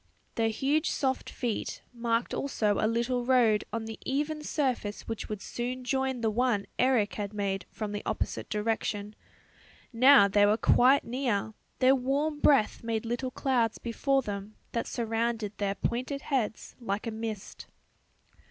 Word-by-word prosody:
Their 225 -1 +1
huge 285 +8 +1
soft 265 -2 -1
feet 235 -4 -3
marked 235 0 -1
also 215 -7 0
a 215 - +2
little 240 +2 0
road 240 -4 +3
on 225 +1 -3
the 225 -1 -7
even 300 +3 -1
surface 255 -9 -2
which 225 -1 -5
would 210 -2 -5
soon 250 +1 -4
join 265 0 -1
the 220 -1 +1
one 230 -3 +1
Eric 250 -5 +3
had 205 -1 -4
made 195 -3 -2
from 215 -2 -5
the 205 0 -3
opposite - - -3
direction. 210 -1 -2 0.8
Now 250 -3 +7
they 205 +1 +4
were 210 +1 +3
quite 260 +4 +5
near; 230 -4 -1 0.2
their 260 +1 +5
warm 280 +4 0
breath 275 -8 +3
made 230 -1 -2
little 240 +3 -2
clouds 250 -4 0
before 270 +3 0
them 205 0 -6 0.2
that 230 - -2
surrounded 225 -2 -2
their 200 -1 0
pointed 255 +7 -2
heads 245 -6 -2
like 210 -2 -3
a 230 - -2
mist. 220 -2 -6
230 Hz, 150 wpm, -29 LUFS, 215-260 Hz, 0.8 s, Now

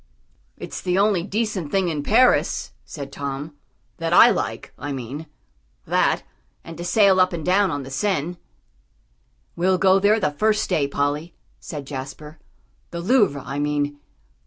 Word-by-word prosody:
"It's - - -7
the 180 0 0
only 200 -3 +3
decent 205 -4 -2
thing 190 +1 +1
in 155 -3 -2
Paris," 235 - +2
said 140 -3 -8
Tom, 140 +2 -5 0.4
"that - - -3
I - - +8
like, - - -3
I 145 - -6
mean; 135 +4 -6 0.6
that, - - +1 0.4
and 165 - -9
to - - -4
sail 190 +1 +4
up 185 0 +3
and 160 -3 -4
down 195 +2 +3
on 145 -1 -3
the 135 - -10
Seine." 175 +2 -1 1.2
"We'll 185 +2 +2
go 190 +1 +4
there 210 +3 +3
the 190 -7 0
first 215 +8 +1
day, 140 -2 +2
Polly," 145 +4 -2 0.2
said 145 -4 -7
Jasper, 145 +3 -8 0.5
"the 170 - -6
Louvre, 185 - +2
I 140 +1 -4
mean. 145 0 -1
165 Hz, 155 wpm, -22 LUFS, 145-195 Hz, 1.2 s, I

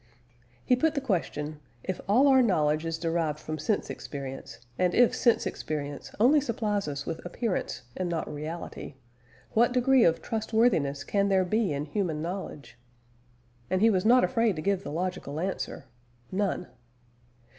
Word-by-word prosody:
He 250 - +4
put 315 +5 +1
the - - +2
question, 155 - -2 0.2
If 185 - -3
all 250 +8 +5
our 265 -1 +6
knowledge 155 -7 +2
is 165 0 -2
derived 165 -2 -1
from 155 0 -6
sense 200 +8 0
experience, 135 -4 -7 0.2
and 180 -1 +2
if 245 -1 +5
sense 235 -2 +2
experience 145 -2 -4
only 280 +7 +5
supplies 215 - -1
us 145 -1 -4
with 165 - -5
appearance 180 - -3
and 185 -1 -2
not 165 -2 -2
reality, 155 -1 -6 0.6
what 235 +2 +3
degree 255 0 +4
of 165 -1 +3
trustworthiness 220 - +1
can 200 -1 +1
there 190 -1 +3
be 215 +1 +1
in 145 +1 -2
human 165 -2 -2
knowledge? 170 -6 -6 0.9
And 185 - +1
he 225 +3 +5
was 185 -3 +1
not 250 +3 +6
afraid 230 -5 +2
to 155 - -4
give 195 -1 +1
the 145 - -6
logical 170 -3 -3
answer 185 -5 -3 0.5
None. 190 -2 -1
185 Hz, 155 wpm, -28 LUFS, 155-225 Hz, 0.9 s, our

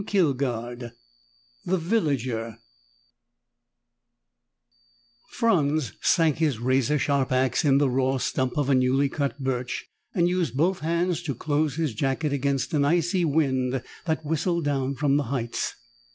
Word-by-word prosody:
3: 200 0 0
THE - - +6
GREEDY 120 -2 -4 0.8
VILLAGER 140 - -1 2.7
Franz 155 - +1
sank 165 -5 +3
his 155 -6 +1
razor 130 +4 +1
sharp 140 -1 0
ax 130 0 +2
in 140 -3 +4
the 145 0 +3
raw 130 +1 +1
stump 130 +1 -1
of 145 -2 +1
a - - +5
new 130 +2 +3
cut 140 0 -2
birch 125 -2 -2 0.3
and 175 -2 +3
used 175 -8 -1
both 180 +5 +2
hands 170 +2 0
to 150 -6 -3
close 150 +2 0
his 160 -6 -1
jacket 135 +5 -1
against 140 0 -1
an 145 -2 +3
icy 175 +4 +2
wind 130 -4 0 0.2
that 160 -2 -1
whistled 160 +2 0
down 140 -1 0
from 140 0 +2
the 145 - +1
heights. 120 -4 -2
140 Hz, 135 wpm, -25 LUFS, 130-160 Hz, 2.7 s, THE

